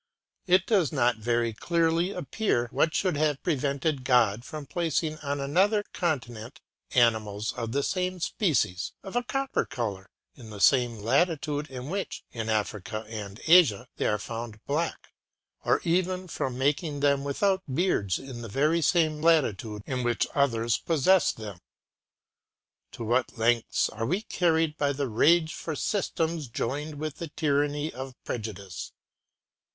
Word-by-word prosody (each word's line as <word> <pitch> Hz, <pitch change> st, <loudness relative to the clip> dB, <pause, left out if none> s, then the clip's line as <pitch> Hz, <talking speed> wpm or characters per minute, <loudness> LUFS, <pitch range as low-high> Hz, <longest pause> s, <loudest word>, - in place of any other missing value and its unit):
It 185 Hz, +1 st, +4 dB
does 195 Hz, -9 st, +2 dB
not 125 Hz, -5 st, +2 dB
very 115 Hz, +1 st, 0 dB
clearly 170 Hz, -, +1 dB
appear 195 Hz, -, -1 dB
what 160 Hz, -, +1 dB
should 185 Hz, -5 st, +1 dB
have 150 Hz, -2 st, 0 dB
prevented 140 Hz, -2 st, 0 dB
God 120 Hz, -4 st, +3 dB
from 150 Hz, +2 st, -7 dB
placing 160 Hz, 0 st, -1 dB
on 145 Hz, -1 st, -3 dB
another 190 Hz, +10 st, +2 dB
continent 130 Hz, -, -3 dB, 0.4 s
animals 110 Hz, -3 st, +2 dB
of 115 Hz, -1 st, -4 dB
the 140 Hz, +3 st, 0 dB
same 185 Hz, +1 st, -1 dB
species, 145 Hz, -, 0 dB
of 195 Hz, -, -8 dB
a 245 Hz, -, +3 dB
copper 270 Hz, +2 st, -1 dB
color, 105 Hz, -8 st, -4 dB, 0.2 s
in 120 Hz, -5 st, -12 dB
the 105 Hz, -2 st, -9 dB
same 120 Hz, 0 st, +4 dB
latitude 150 Hz, -, 0 dB
in 130 Hz, 0 st, -7 dB
which, 195 Hz, 0 st, -4 dB
in 115 Hz, -2 st, -4 dB
Africa 110 Hz, 0 st, -2 dB
and 105 Hz, -2 st, -7 dB
Asia, 160 Hz, -, +6 dB
they -, -, 0 dB
are 105 Hz, -, +1 dB
found 115 Hz, +1 st, -6 dB
black; 160 Hz, +4 st, -2 dB, 0.5 s
or -, -, +3 dB
even 185 Hz, +2 st, 0 dB
from 130 Hz, -6 st, -3 dB
making 145 Hz, +2 st, 0 dB
them 140 Hz, -1 st, +3 dB
without 190 Hz, +7 st, +1 dB
beards 130 Hz, -, +1 dB
in 130 Hz, -3 st, -8 dB
the 115 Hz, -, -7 dB
very 155 Hz, +9 st, +2 dB
same 155 Hz, -1 st, +2 dB
latitude 115 Hz, -10 st, +2 dB
in 130 Hz, -1 st, -2 dB
which 120 Hz, -2 st, +1 dB
others 120 Hz, -5 st, +1 dB
possess 165 Hz, +2 st, +3 dB
them. 105 Hz, -5 st, -8 dB, 1.3 s
To -, -, -6 dB
what 120 Hz, +2 st, 0 dB
lengths 115 Hz, +1 st, +2 dB
are 115 Hz, -, -4 dB
we 185 Hz, -, 0 dB
carried 160 Hz, -5 st, +1 dB
by 145 Hz, -1 st, +2 dB
the 140 Hz, 0 st, -2 dB
rage 160 Hz, +8 st, +3 dB
for 160 Hz, -, -5 dB
systems 165 Hz, -5 st, -1 dB
joined 145 Hz, +6 st, -3 dB
with 155 Hz, 0 st, -5 dB
the 170 Hz, -, -5 dB
tyranny 145 Hz, 0 st, 0 dB
of 130 Hz, 0 st, -7 dB
prejudice! 100 Hz, -6 st, -6 dB
140 Hz, 145 wpm, -27 LUFS, 115-165 Hz, 1.3 s, Asia